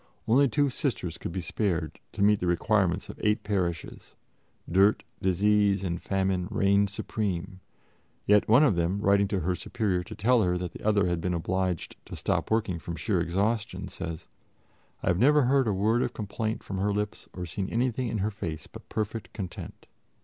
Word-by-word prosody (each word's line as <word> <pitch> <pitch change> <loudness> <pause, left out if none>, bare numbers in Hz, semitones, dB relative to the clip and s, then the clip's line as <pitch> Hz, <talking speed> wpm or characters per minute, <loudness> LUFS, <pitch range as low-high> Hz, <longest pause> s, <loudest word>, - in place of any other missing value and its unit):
Only 135 +5 +5
two 140 +4 +1
Sisters 120 - -2
could - - -5
be 95 +2 -3
spared 85 -2 -2
to - - 0
meet 105 0 +5
the 90 - -1
requirements 90 +1 +1
of - - -10
eight 105 0 +2
parishes; 90 -6 -3 0.5
dirt, 95 +5 +4 0.2
disease 100 +1 +3
and 85 -2 -2
famine 95 -2 0
reigned 100 +1 +3
supreme; 95 -2 -3 0.7
yet 105 0 +4
one 125 +7 +7
of 130 -11 +4
them, 85 +3 0
writing 100 0 +3
to 95 -1 -1
her 90 +3 0
Superior 95 0 -1
to - - -8
tell 120 +3 +3
her 90 -3 +1
that 90 -2 -4
the - - -11
other 105 -2 +3
had 85 -2 0
been 90 +1 -1
obliged 90 0 -2
to - - -8
stop - - -1
working 110 -6 0
from 85 +1 -6
sheer 85 +4 0
exhaustion, 100 +2 -1
says: 85 -4 -6 0.8
"I - - -3
have 90 0 +2
never 145 +4 +5
heard 135 0 +3
a - - +2
word 110 +5 +2
of - - -2
complaint 110 +1 -3
from 95 -1 -4
her 100 +2 +1
lips 105 +1 -3
or 90 -1 -5
seen 95 +3 -4
anything 125 +1 0
in 110 - -2
her 110 - 0
face 80 -6 -5
but - - -13
perfect 110 +1 -3
content." 95 -5 -7
100 Hz, 185 wpm, -28 LUFS, 90-110 Hz, 0.8 s, one